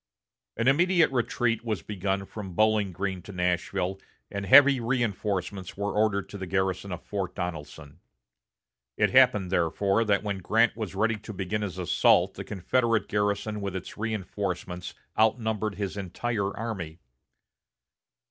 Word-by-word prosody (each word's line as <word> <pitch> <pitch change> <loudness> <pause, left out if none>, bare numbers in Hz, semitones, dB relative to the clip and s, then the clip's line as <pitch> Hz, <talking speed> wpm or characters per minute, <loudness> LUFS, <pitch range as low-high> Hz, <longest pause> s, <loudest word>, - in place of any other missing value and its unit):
An 115 +2 0
immediate 170 +4 +4
retreat 115 -2 0
was 110 -7 -3
begun 95 -1 -2
from 95 -3 -8
Bowling 110 -2 +3
Green 95 +1 -3
to 100 - -10
Nashville, 90 +1 -1 0.3
and 100 -1 -4
heavy 140 +3 +8
reinforcements 105 -6 -2
were 100 0 -2
ordered 105 -2 +1
to 100 - -8
the 95 - -5
garrison 95 +1 -1
of 90 -1 -6
Fort 95 -3 -4
Donelson. 80 -4 -6 1.0
It - - +3
happened, 125 -8 +5
therefore, 95 +5 +2
that 100 -1 +2
when 100 -2 -2
Grant 115 +5 +2
was 110 -4 -5
ready 110 +2 +1
to 110 +1 -9
begin 100 +2 -2
his 95 -3 -4
assault 90 -2 +3
the - - -7
Confederate 115 +4 0
garrison 105 +1 -1
with 100 -1 -4
its 95 - -6
reinforcements 95 -4 -4 0.2
outnumbered 110 -2 +1
his 100 -2 -3
entire 100 +2 -2
army. 100 -8 -5
100 Hz, 140 wpm, -27 LUFS, 95-110 Hz, 1.0 s, heavy